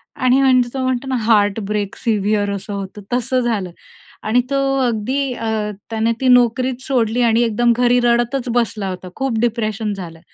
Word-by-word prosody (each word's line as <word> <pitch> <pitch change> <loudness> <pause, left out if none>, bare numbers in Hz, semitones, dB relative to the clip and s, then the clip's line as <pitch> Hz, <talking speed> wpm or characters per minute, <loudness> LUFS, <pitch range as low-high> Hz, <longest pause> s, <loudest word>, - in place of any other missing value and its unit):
आणि 255 +1 +3
म्हणजे 255 -2 +3
तो 270 - -3
म्हणतो 255 +1 -1
ना, 260 - -1
हार्टब्रेक 205 -2 +1
सिव्हिअर 210 -2 0
असं 200 +1 -6
होतं, 200 +1 -6
तसं 255 +1 +1
झालं. 210 -7 -2 0.5
आणि 230 +3 +2
तो 275 - +1 0.3
अगदी 250 +4 -1
अ, 220 -2 -2 0.2
त्याने 225 0 0
ती 260 - +1
नोकरीच 250 +1 +3
सोडली 245 -2 +1
आणि 230 0 +3
एकदम 235 +1 +2
घरी 245 0 +3
रडतच 240 +2 +1
बसला 215 -4 0
होता, 185 0 -7
खूप 265 -4 -1
डिप्रेशन 220 -2 -1
झालं. 170 -4 -8
230 Hz, 165 wpm, -19 LUFS, 210-250 Hz, 0.5 s, आणि